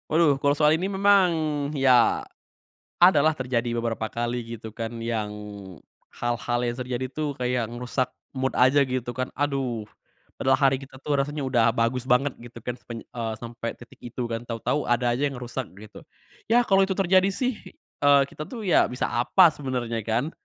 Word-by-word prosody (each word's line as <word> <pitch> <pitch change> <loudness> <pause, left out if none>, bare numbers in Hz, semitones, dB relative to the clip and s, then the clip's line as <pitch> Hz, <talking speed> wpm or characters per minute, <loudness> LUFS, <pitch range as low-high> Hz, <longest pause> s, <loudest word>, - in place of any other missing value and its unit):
Waduh, 160 -2 +4
kalau 140 - +4
soal 150 +1 +4
ini 185 +4 -2
memang, 195 -2 +4 0.4
ya, 130 -4 +3 0.8
adalah 155 -3 +5
terjadi 125 -3 -1
beberapa 115 -1 -2
kali, 120 0 -3
gitu 110 0 -9
kan, 115 +1 -5
yang 115 -2 -1 0.9
hal-hal 120 0 -1
yang 120 - 0
terjadi 125 0 -3
tuh, 150 0 -3
kayak 125 -2 -1
ngerusak 125 +2 -2 0.2
mood 130 0 -2
aja, 130 +3 +5
gitu 125 -1 -3
kan. 130 +1 -3
Aduh, 135 -6 -1 0.6
padahal 130 0 +3
hari 135 -2 +2
kita 135 -1 -13
tuh 145 -2 0
rasanya 145 +1 -2
udah 125 -4 +3
bagus 120 +2 0
banget, 130 +3 +3
gitu 120 -1 -12
kan, 125 0 -5
sepanj 115 -1 -8
eee, 115 -2 -5
sampai 115 0 -6
titik 120 - -16
itu, 120 +1 -6
kan. 115 +1 -4
Tau-tau, 115 +5 -2
ada 120 0 +2
aja 135 +5 +1
yang 135 - -6
ngerusak, 125 0 -5
gitu. 105 +1 -12 0.5
Yah, 240 +2 +4
kalo 195 -3 +3
itu 190 - -1
terjadi 190 0 +4
sih, 235 +4 -2 0.4
eee, 145 -1 +6
kita 155 - -7
tuh, 235 -4 -7
ya 180 -5 +4
bisa 125 - -4
apa, 165 +8 +5
sebenernya, 125 -6 -3
kan. 115 +7 -1
130 Hz, 175 wpm, -25 LUFS, 120-145 Hz, 0.9 s, eee